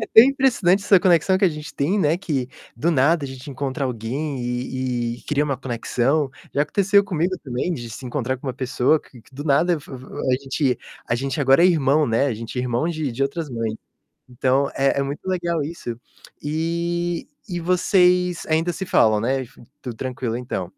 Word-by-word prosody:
é 220 - -2
tão 225 - +8
impressionante 245 -9 +3
essa 200 -1 +6
conexão 180 +1 +3
que 190 - +2
a - - +6
gente 150 -2 -7
tem, 170 +9 +1
né, 160 -2 +2
que, 145 -9 -2 0.3
do 170 - 0
nada, 155 +2 +3
a - - -4
gente 130 +1 -9
encontrar 135 +1 -3
alguém 130 +4 -3
e 125 +1 -2 0.2
e - - -17
cria 150 0 +1
uma 140 -2 -1
conexão. 130 +3 0 0.2
Já 145 - +3
aconteceu 200 +6 +3
comigo 185 -1 -1
também 130 +6 -2
de 120 -7 -6
se 125 +4 -8
encontrar 130 0 -2
com 140 - -10
uma 130 - -2
pessoa 130 +3 +2
que 125 - -17
que, 130 - -23
do 145 +2 -6
nada, 160 +4 +3
eu - - -3
f 145 - -15
f 130 -1 -8 0.2
a 130 - +3
gente 135 -1 0 0.3
a - - 0
gente 135 +5 -2
agora 135 +3 +5
é 180 - +8
irmão, 150 -3 +3
né, 115 +4 +2
a 130 - -1
gente 115 +3 -6
é - - 0
irmão 125 +6 0
de 155 -6 -2
de 125 +4 -2
outras 145 +2 -2
mães. 115 -2 -2 0.6
Então 130 +3 +1
é 135 +1 +2
é - - +2
muito 140 +1 -6
legal 170 -4 0
isso. 125 -7 -6 0.4
E 170 +3 -2 0.2
e 175 -1 -2
vocês 180 0 +2
ainda 160 +2 +1
se 190 +3 -5
falam, 110 - +4
né, 130 +5 0
enf 125 +1 -11 0.3
tudo 125 -3 -6
tranquilo 125 -1 -3
então? 125 0 -4
140 Hz, 210 wpm, -22 LUFS, 130-170 Hz, 0.6 s, tão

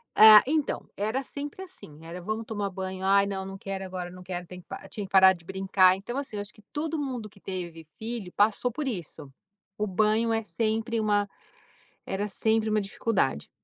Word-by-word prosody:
Ah, 215 -1 +10
então, 300 +1 -1
era 220 +7 -1
sempre 290 +7 -6
assim, 350 - -13
era: 170 +2 -7
"Vamos 215 +4 -3
tomar 205 -2 -2
banho, 190 0 -5
ai 200 +1 +5
não, 195 -1 -3
não 195 0 -7
quero 195 0 -5
agora, 180 -1 -5
não 180 0 -11
quero, 180 -1 -5
tenho 180 +1 -10
que" - - -9
tinha 205 - -5
que 190 - -14
parar 190 -1 +8
de 170 -2 -14
brincar, 190 0 +4
então 220 +7 -6
assim 275 -6 -4
eu 205 - -2
acho 205 +2 -9
que 215 - -19
todo 315 +1 -2
mundo 250 -6 -4
que 200 - -20
teve 175 -4 -6
filho, 220 -4 -5
passou 220 +4 +2
por 285 +4 -3
isso. 165 - -5 0.5
O 210 - -1
banho 215 +4 +2
é 225 0 0
sempre 225 +4 -1
uma 205 -1 +2 0.8
era 200 +2 -2
sempre 220 +2 +1
uma 215 0 +2
dificuldade. 200 - -1
205 Hz, 200 wpm, -27 LUFS, 190-225 Hz, 0.8 s, Ah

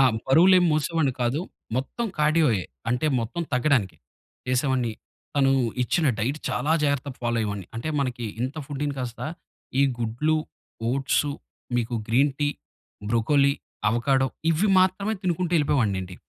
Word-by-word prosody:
ఆ! - - +7 0.2
బరువులేం 180 +6 +6
మోసేవాడిని 155 -3 +1
కాదు. 120 +6 0 0.4
మొత్తం 185 - -2
కార్డియోయె. 150 - +3 0.3
అంటే 125 +5 +1
మొత్తం 120 +10 -3
తగ్గడానికి 125 - +2 0.5
చేసేవాడిని. 130 -2 +1 0.4
తను 135 -1 +4 0.3
ఇచ్చిన 155 +6 +1
డైట్ 130 +7 -1
చాలా 150 - 0
జాగ్రత్తగా 140 -2 -1
ఫాలో 120 0 0
అయ్యేవాడిని. 100 -4 -3
అంటే 115 - -3
మనకి 125 -3 -2 0.2
ఇంత 130 +3 -2
ఫుడ్డు‌ని 145 0 -3
కాస్త 120 -2 -5 0.6
ఈ - - +6 0.2
గుడ్లు, 120 +8 0 0.5
ఓట్సు, 140 +2 +1 0.4
మీకు 120 0 -1
గ్రీన్ 135 +5 +3
టీ, 145 - +3 0.6
బ్రోకోలీ, 140 +5 +3 0.4
అవకాడో 130 +3 +2 0.2
ఇవి 185 +6 +2
మాత్రమే 190 +3 +1
తినుకుంటూ 180 -1 -1
ఎళ్ళిపోయేవాడినండి. 100 -11 0
135 Hz, 125 wpm, -25 LUFS, 120-155 Hz, 0.6 s, ఆ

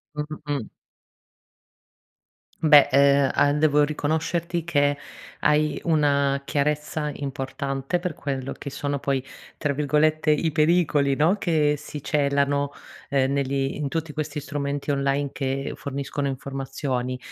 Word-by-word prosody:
Mh-mh, 150 +1 -5
mh. 140 -6 -3 1.9
Beh, 150 -3 +7
uhm, 140 0 +5
a 145 - +3
devo 150 -1 +4
riconoscerti 160 +3 -1
che 145 -3 +2 0.4
hai 150 -1 +2
una 140 -3 +2
chiarezza 150 +1 -1
importante 135 +3 -3
per 180 -2 -3
quello 135 -3 -4
che - - -8
sono 140 +1 -3
poi, 135 -1 -1 0.3
tra 145 -3 -1
virgolette, 150 +2 +2
"i 155 +1 +2
pericoli" 155 -3 +3
no, 165 +7 +3
che 155 -5 +2
si 150 0 -8
celano, 140 -1 +1 0.4
uhm, 135 -1 +1
negli 135 -1 -1
in 145 -1 -2
tutti 160 +1 -3
questi 150 -1 -4
strumenti 145 -1 -3
online 140 0 0
che 135 0 -2
forniscono 140 +1 -4
informazioni, 135 -1 -3
145 Hz, 120 wpm, -24 LUFS, 140-150 Hz, 1.9 s, Beh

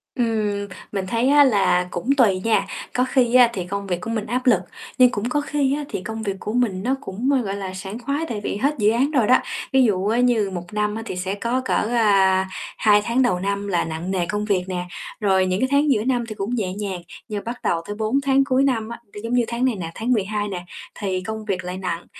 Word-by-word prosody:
Ừm, 215 -4 0 0.2
mình 195 -2 -3
thấy 235 +6 +1
á 290 0 +7
là 195 -7 +3
cũng 175 +10 -4
tùy 195 -7 +4
nha. 225 -1 +2 0.3
Có 250 - +2
khi 250 -2 +2
á 250 -2 +7
thì 180 -3 -3
công 200 +1 -4
việc 180 -1 -2
của 230 - -5
mình 220 -2 -2
áp 250 +4 -2
lực, 220 -7 +6 0.4
nhưng 255 -1 +7
cũng 225 +1 -2
có 295 +2 +1
khi 285 -2 0
á 295 - -3
thì 185 - -4
công 220 +1 -5
việc 195 -2 -2
của 210 - -4
mình 210 -7 0
nó 260 +4 +1
cũng, 235 +4 -3
ơ, 270 - +3
gọi 200 -3 -3
là, 190 -2 -5
sảng 195 +4 -6
khoái, 280 +6 -2
tại 215 -3 -3
vì - - -2
hết 280 +6 +1
dự 210 -2 +3
án 260 +6 +1
rồi 250 -8 +2
đó. 255 - +7 0.4
Ví 265 - +6
dụ, 200 -4 +1
á, 230 +3 +2
như 240 -5 +3
1 175 +1 -7
năm 210 0 0
á 225 - -4
thì 185 - -5
sẽ 185 +1 -2
có 235 +5 -1
cỡ, - - 0 0.2
à, 195 -5 +3 0.3
2 210 -1 +5
tháng 235 +3 +2
đầu 185 -8 +2
năm 200 +2 -2
là 180 -3 +1
nặng 160 +3 -4
nề 180 -3 0
công 210 +3 -2
việc 190 -4 +1
nè, 180 -1 -3 0.3
rồi 190 -3 +3
những, 185 +1 0
cái, 260 - +2
tháng 285 +1 +3
giữa 215 -4 +2
năm 245 -1 +1
thì 215 - -6
cũng 210 +4 -2
nhẹ 190 -6 -2
nhàng. 195 -3 -4 0.3
Nhưng 210 -2 -4
bắt 240 +1 -5
đầu 165 - +1
tới 205 - -4
4 220 +6 0
tháng 275 0 +3
cuối 270 0 +2
năm 230 -5 0
á, 235 - -7
nó 205 - -7
giống 230 - -3
như 245 -1 +4
tháng 240 +2 -1
này 255 -4 +1
nè, 165 -3 -5
tháng 230 +3 -2
12 210 0 -1
nè, 180 -3 -5 0.3
thì 190 -3 -1
công 220 +2 -5
việc 185 -3 -2
lại 180 +1 -5
nặng. 180 -2 -4
210 Hz, 260 wpm, -22 LUFS, 190-245 Hz, 0.4 s, á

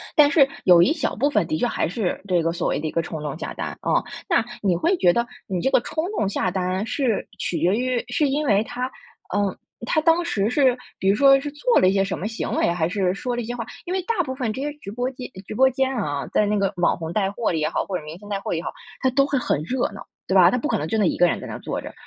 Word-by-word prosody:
但 290 -1 +6
是 275 -4 +6 0.2
有 175 -2 +7
一 285 - +4
小 305 -6 -2
部 285 +5 +2
分 - - +2
的 315 - -1
确 245 - +1
还 - - -1
是 190 +1 -2
这 175 -2 +3
个 165 +1 0
所 175 - -1
谓 - - 0
的 155 - -3
一 - - -3
个 165 - +1
冲 160 -1 -6
动 150 0 -4
下 - - -5
单， - - -5
嗯。 - - +3 0.3
那 240 -10 +3 0.2
你 190 -4 +2
会 345 - +2
觉 175 - +5
得， 235 +5 +1 0.2
你 185 -3 -2
这 265 - +1
个 - - +4
冲 315 +6 -3
动 200 - +1
下 190 -2 0
单 185 +2 -1
是 255 -7 0
取 170 - -2
决 180 +5 +2
于 250 0 0
是 280 +4 +1
因 295 +2 0
为 205 -3 +3
他， 250 +2 -4 0.5
嗯， 200 -2 +1 0.3
他 310 - +2
当 330 +2 +3
时 210 -8 0
是 260 -1 +3 0.2
比 190 - -1
如 200 - +4
说 275 +2 +6
是 290 - -4
做 475 +12 +2
了 185 - +4
一 - - +1
些 195 - +3
什 195 - -3
么 200 - -3
行 225 - -4
为， - - +2
还 170 -2 0
是 185 -2 0
说 245 +5 -3
了 240 - -2
一 225 - -5
些 240 +1 -4
话 230 -2 -4 0.2
因 360 - -3
为 380 - 0
大 420 -1 0
部 260 -3 -4
分 245 -5 -2
这 260 - -5
些 295 +1 -2
直 200 -9 -9
播 245 +4 -2
间 255 0 -8 0.2
直 215 - -6
播 265 +2 +5
间 265 0 0
啊， 145 - -2
在 210 - +3
那 210 0 +1
个 195 0 +1
网 175 - +2
红 165 -1 -5
带 195 -2 +1
货 225 -1 -1
里 160 - -1
也 155 - 0
好， - - -1
或 190 - -2
者 155 - -9
明 155 +3 -8
星 205 - -14
带 200 -1 -1
货 - - -3
也 165 - -1
好， - - -4 0.3
他 260 - +3
都 275 +2 +3
会 280 -1 0
很 150 - 0
热 255 +8 -1
闹。 200 - -10 0.2
对 190 - 0
吧， 180 -1 +7
他 250 - +1
不 275 - -2
可 - - +1
能 150 - -3
就 220 - -1
那 210 - +3
一 - - +1
个 175 - +4
人 175 - +1
在 - - -8
那 - - -5
坐 - - -4
着， - - -9
215 Hz, 325 characters per minute, -23 LUFS, 180-265 Hz, 0.5 s, 有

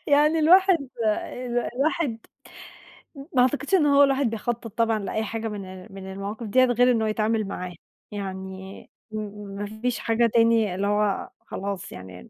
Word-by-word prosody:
يعني 300 +2 +4
الواحد 345 -3 +5 0.2
ال 245 +3 -1 0.2
الواحد 275 -3 0 1.2
ما 255 - +4
اعتقدش 280 +7 +1
إن 330 -5 +4
هو 285 0 +6
الواحد 275 -3 +2
بيخطّط 230 +1 -3
طبعًا 225 -1 +2
لأي 210 +2 -2
حاجة 225 +1 -3
من 195 -1 -8
من 190 0 -8
المواقف 200 +4 -5
ديَّة 255 +5 +5
غير 245 +1 +4
إن 230 -2 +1
هو 220 - +1
يتعامل 215 0 0
معاها، 180 -2 -6 0.4
يعني 190 -1 -7 0.2
م 215 - -4
م 205 -1 -7
ما 205 +1 -3 0.2
فيش 250 -1 0
حاجة 230 +1 +2
تاني، 230 -4 +3
اللي 200 +2 -1
هو 205 -1 0 0.2
خلاص 195 -2 -5
يعني 90 -1 -11
220 Hz, 160 wpm, -25 LUFS, 200-250 Hz, 1.2 s, هو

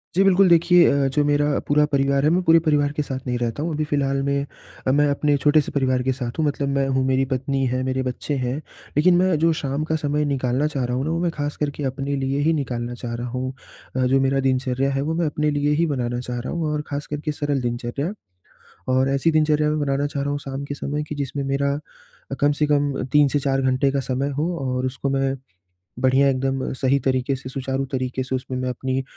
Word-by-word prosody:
जी 190 - +5
बिल्कुल, 195 0 +5
देखिए 170 +1 +6
अ, 140 -1 +2
जो 135 +2 +1
मेरा 145 0 +2
पूरा 150 +1 +4
परिवार 140 -1 +1
है 150 - +4
मैं 180 +2 +3
पूरे 165 -1 +6
परिवार 145 -1 +3
के - - +2
साथ 135 -2 -4
नहीं 125 0 0
रहता 120 +4 -2
हूँ 165 0 -2
अभी 155 +1 -1
फ़िलहाल 140 -2 0
में 140 0 0 0.4
अ, - - +4
मैं 145 +2 +3
अपने 145 +1 +2
छोटे 150 +2 +4
से - - -6
परिवार 130 -2 +1
के 130 - +1
साथ 125 -2 -4
हूँ 155 - +2
मतलब 145 -1 -1
मैं 135 0 +1
हूँ, 130 -1 +1
मेरी 130 0 +2
पत्नी 135 +1 0
है, 130 +1 -1
मेरे 130 0 -1
बच्चे 130 +3 -3
हैं। 125 +1 -1 0.4
लेकिन 175 +4 +5
मैं 185 -1 +3
जो 165 +1 +4
शाम 140 +1 -2
का 160 +1 -1
समय 150 -1 0
निकालना 135 0 0
चाह 140 -4 -2
रहा 125 0 -2
हूँ 130 - -1
ना 155 - -1
वो 165 - 0
मैं 175 -1 +1
ख़ास 145 -2 -4
करके 145 0 -3
अपने 135 +1 -2
लिए 135 0 -1
ही 160 +3 +3
निकालना 120 -5 -3
चाह 120 -1 -6
रहा 120 +1 -4
हूँ 130 +1 -3 0.4
अ, 130 -1 +2
जो 135 +2 +3
मेरा 135 +1 +2
दिनचर्या 130 +1 0
है 135 0 -1
वो 155 +3 -1
मैं 170 +1 0
अपने 150 0 0
लिए 145 0 +1
ही - - +4
बनाना 120 -5 -2
चाह 125 0 -4
रहा 120 - -5
हूँ 160 -3 -1
और 150 - -1
ख़ास 145 0 -4
करके 150 +1 -3
सरल 145 -2 -1
दिनचर्या। 120 +6 -3 0.8
और 130 +1 +3
ऐसी 140 +4 +2
दिनचर्या 155 -1 +2
मैं 155 - 0
बनाना 140 0 0
चाह 145 -1 -3
रहा 140 - -2
हूँ 145 - -1
शाम 140 0 -6
के 145 - -5
समय 145 +1 -3
कि - - -4
जिसमें 140 -1 -3
मेरा 140 +1 0 0.6
अ, - - +1
कम 145 +1 +4
से 150 +1 0
कम 145 -1 +2 0.2
3 150 -1 +5
से 145 - +1
4 135 -1 0
घंटे 130 +1 +2
का 140 - 0
समय 135 +1 -1
हो 170 +4 0
और 125 0 -1
उसको 130 +2 -3
मैं 135 0 +1 0.7
बढ़िया 130 +2 +4
एकदम 135 0 -1
सही 130 +1 +2
तरीके 130 +1 +1
से, 130 0 -8
सुचारू 135 0 -2
तरीके 130 -1 -2
से 130 +1 -2
उसमें 130 0 -4
मैं 130 0 -2
अपनी 130 +1 -2
140 Hz, 245 wpm, -22 LUFS, 130-150 Hz, 0.8 s, देखिए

